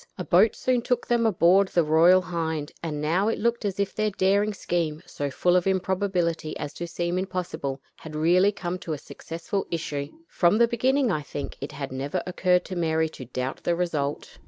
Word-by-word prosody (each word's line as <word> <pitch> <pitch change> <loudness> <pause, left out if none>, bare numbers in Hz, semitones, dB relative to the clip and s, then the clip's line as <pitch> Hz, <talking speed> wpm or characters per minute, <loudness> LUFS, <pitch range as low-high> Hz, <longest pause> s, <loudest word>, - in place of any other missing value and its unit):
A 180 - -3
boat 190 +6 +4
soon 255 -1 +1
took 245 0 -1
them 235 -1 +2
aboard 190 0 +4
the 175 -2 +2
Royal 170 +4 +5
Hind, 160 -4 -3
and 155 -3 -3
now 170 +7 +1
it 225 - 0
looked 235 +1 0
as 200 -1 -2
if 200 -1 0
their 215 0 0
daring 200 +2 +2
scheme, 170 -5 -2
so 145 -1 -4
full 175 +6 +2
of 180 +1 +2
improbability 185 -4 0
as 145 - -5
to 170 - -5
seem 175 +1 -2
impossible, 175 -7 -3 0.2
had 155 -1 -9
really 180 +6 +4
come 180 -2 -4
to 170 -5 -4
a - - -3
successful 170 +7 -5
issue. 150 -4 -3 0.2
From 175 +4 +3
the 235 0 +5
beginning, 255 +2 +2
I 155 - 0
think, 145 -1 -6
it 140 - -5
had 140 -2 -5
never 135 +2 -3
occurred 180 0 +1
to 185 - -6
Mary 160 -2 +1
to 130 - -10
doubt 130 +2 -4
the 170 - +1
result. 155 -5 -3
175 Hz, 200 wpm, -26 LUFS, 155-195 Hz, 0.2 s, Royal